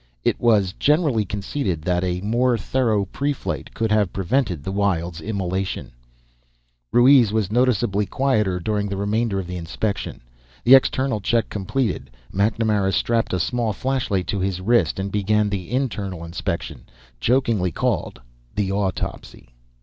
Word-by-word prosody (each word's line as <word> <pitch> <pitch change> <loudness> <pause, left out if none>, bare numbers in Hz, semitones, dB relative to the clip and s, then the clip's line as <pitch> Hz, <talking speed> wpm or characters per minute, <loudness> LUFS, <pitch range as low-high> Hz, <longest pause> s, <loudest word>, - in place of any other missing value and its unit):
It - - +1
was 105 -6 +3
generally 150 -8 +2
conceded 100 - -3
that 90 +1 0
a 90 0 -1
more 120 +4 +2
thorough 110 -3 +1
preflight 140 +8 -3
could 110 -1 -1
have 105 -4 +2
prevented 95 - -1
the 95 - -4
Wyld's 90 -4 -1
immolation. 95 - -3 1.0
Ruiz 120 -2 +6
was 105 -3 0
noticeably 115 -4 +2
quieter 105 -9 +1
during 105 +2 -1
the 100 - -3
remainder 105 +1 0
of 95 - -4
the 90 +1 -5
inspection. 90 - -3 0.4
The 125 - +7
external 130 -3 +4
check 115 +3 +1
completed, 105 +2 -2 0.2
MacNamara 105 -1 +1
strapped 115 -1 +1
a 90 - 0
small 115 +4 0
flashlight 115 -5 -1
to 100 - -1
his 95 -1 -1
wrist 95 -5 +2
and 95 +1 -3
began 105 +1 +1
the 95 -4 -4
internal 100 -9 -2
inspection, 85 +1 -4 0.3
jokingly 115 - +1
called 65 - -1 0.4
the 100 -2 0
autopsy. 100 -9 -3
105 Hz, 140 wpm, -22 LUFS, 95-120 Hz, 1.0 s, The